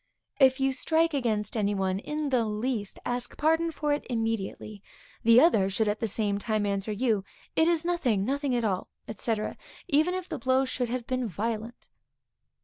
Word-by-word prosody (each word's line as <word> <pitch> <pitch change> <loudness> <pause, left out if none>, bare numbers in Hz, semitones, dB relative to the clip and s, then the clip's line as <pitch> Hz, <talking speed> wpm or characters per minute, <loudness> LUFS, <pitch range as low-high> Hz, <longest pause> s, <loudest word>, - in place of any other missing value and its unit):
If 265 -1 +5
you 270 0 +2
strike 325 +5 +1
against 220 -6 -1
any 205 -2 +1
one 190 -1 0
in 300 +5 -3
the 250 -3 +2
least, 215 -1 -3
ask 245 0 -3
pardon 325 +2 +2
for 295 -1 -1
it 290 - -2
immediately. 225 -3 -3 0.4
The 230 +1 +7
other 220 - +4
should 215 +3 0
at 210 +1 0
the 225 - 0
same 205 -1 0
time 215 0 0
answer 200 +1 -1
you, 215 -2 +1 0.3
It 320 - +4
is 340 -1 +1
nothing, 255 - +1
nothing 275 +1 0
at 235 -2 0
all, 190 -3 -1 0.3
&c., 225 +2 0 0.5
even 325 +3 +2
if 370 -1 -4
the - - -5
blow 260 +2 +2
should 250 -2 -2
have 245 -1 -3
been 255 -1 -1
violent. 225 +4 -4
240 Hz, 180 wpm, -28 LUFS, 210-280 Hz, 0.5 s, The